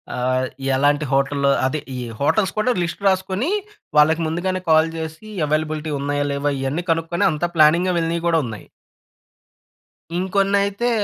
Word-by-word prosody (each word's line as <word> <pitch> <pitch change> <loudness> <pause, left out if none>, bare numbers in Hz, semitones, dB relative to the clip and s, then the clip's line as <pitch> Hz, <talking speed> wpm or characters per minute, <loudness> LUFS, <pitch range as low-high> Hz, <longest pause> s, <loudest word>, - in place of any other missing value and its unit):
ఆహ్, 130 +1 0 0.3
ఎలాంటి 145 +2 +2
హోటల్‌లో 140 +1 +2 0.2
అదే 130 +4 -1 0.2
ఈ - - -4 0.2
హోటల్స్ 190 +7 +1
కూడా 250 +4 +2
లిస్ట్ 170 +3 -5
రాసుకునీ 190 - 0 0.5
వాళ్ళకి 160 +2 +5
ముందుగానే 185 +3 -2
కాల్ 160 +1 +5
చేసి 160 +5 -7 0.2
అవైలబిలిటీ 155 +1 -1
ఉన్నాయా? 145 +1 -1
లేవా? 140 +1 -1
ఇవన్నీ 140 +6 -2
కనుక్కొని 165 +1 0
అంతా 155 +2 -1
ప్లానింగ్‌గా 170 +4 +4
వెళ్ళినవి 165 0 -1
కూడా 165 -1 +3
ఉన్నాయి. 110 -3 -8 1.5
ఇంకొన్నైతే 200 +4 +1
160 Hz, 130 wpm, -21 LUFS, 145-185 Hz, 1.5 s, వాళ్ళకి